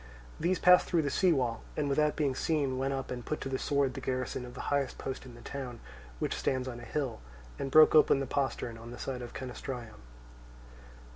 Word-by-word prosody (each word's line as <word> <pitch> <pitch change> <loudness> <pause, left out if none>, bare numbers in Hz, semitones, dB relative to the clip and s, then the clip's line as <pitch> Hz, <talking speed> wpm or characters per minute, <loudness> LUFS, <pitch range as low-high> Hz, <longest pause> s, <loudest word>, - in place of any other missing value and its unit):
These 180 +3 +1
passed 180 0 +6
through 170 -3 +2
the 140 - -1
sea 185 -2 +3
wall, 125 -6 0 0.2
and 150 -2 +1
without 150 +2 +2
being 145 -4 +1
seen 135 -2 0
went 135 +1 0
up 135 -1 -3
and 125 -1 -4
put 155 - -3
to 135 - -3
the 130 - -1
sword 140 -2 +1
the - - -6
garrison 130 -1 -2
of 125 - -11
the - - -8
highest 140 -2 0
post 135 0 -5
in 120 - -11
the 120 - -12
town, 130 -4 -6 0.4
which - - -1
stands 130 -1 -1
on 120 -2 -5
a - - -10
hill, 130 - -3 0.4
and 135 - -2
broke 155 +3 +8
open 150 -3 +6
the 135 - -1
postern 125 -4 -2
on 115 +1 -9
the 120 - -8
side 130 -1 -4
of 120 - -8
Canastraeum. 125 - -6
135 Hz, 220 wpm, -31 LUFS, 125-145 Hz, 0.4 s, broke